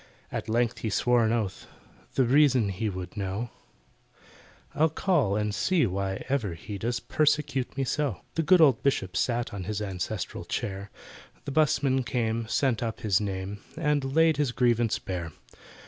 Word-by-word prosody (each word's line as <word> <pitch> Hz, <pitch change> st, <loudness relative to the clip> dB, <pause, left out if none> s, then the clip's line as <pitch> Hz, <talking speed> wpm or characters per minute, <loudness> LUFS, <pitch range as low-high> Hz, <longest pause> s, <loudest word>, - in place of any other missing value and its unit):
At -, -, -4 dB
length 120 Hz, +1 st, +1 dB
he 110 Hz, -, -2 dB
swore 120 Hz, +3 st, +3 dB
an 110 Hz, -, +1 dB
oath, 110 Hz, -5 st, -2 dB, 0.5 s
The 135 Hz, -, +4 dB
reason 130 Hz, -4 st, +4 dB
he 105 Hz, +3 st, -2 dB
would 90 Hz, -1 st, -6 dB
know— 100 Hz, +3 st, -3 dB, 1.2 s
"I'll 160 Hz, +2 st, +3 dB
call 150 Hz, -, +1 dB
and 105 Hz, 0 st, -1 dB
see 175 Hz, -, +2 dB
why 95 Hz, 0 st, -2 dB
ever 120 Hz, -10 st, -1 dB
he 100 Hz, +4 st, -7 dB
Does 120 Hz, +4 st, -1 dB
persecute 145 Hz, -4 st, 0 dB
me 135 Hz, -, +1 dB
so!" 130 Hz, -8 st, -1 dB
The 165 Hz, -, 0 dB
good 175 Hz, +2 st, +5 dB
old 135 Hz, -7 st, +5 dB
Bishop 95 Hz, -10 st, 0 dB
sat 120 Hz, +2 st, 0 dB
On 95 Hz, -3 st, -5 dB
his 105 Hz, +1 st, -2 dB
ancestral 95 Hz, -1 st, -4 dB
chair, 100 Hz, 0 st, -4 dB, 0.6 s
The 140 Hz, -, -4 dB
'busman 135 Hz, -3 st, +2 dB
came, 115 Hz, -2 st, -1 dB
sent 125 Hz, 0 st, +1 dB
up 115 Hz, -2 st, -3 dB
his 105 Hz, -2 st, +2 dB
name, 100 Hz, 0 st, -4 dB, 0.2 s
And 150 Hz, -3 st, 0 dB
laid 160 Hz, -2 st, +5 dB
his 145 Hz, -4 st, +1 dB
grievance 120 Hz, -2 st, +2 dB
bare. 85 Hz, -4 st, -5 dB
115 Hz, 165 wpm, -27 LUFS, 100-140 Hz, 1.2 s, good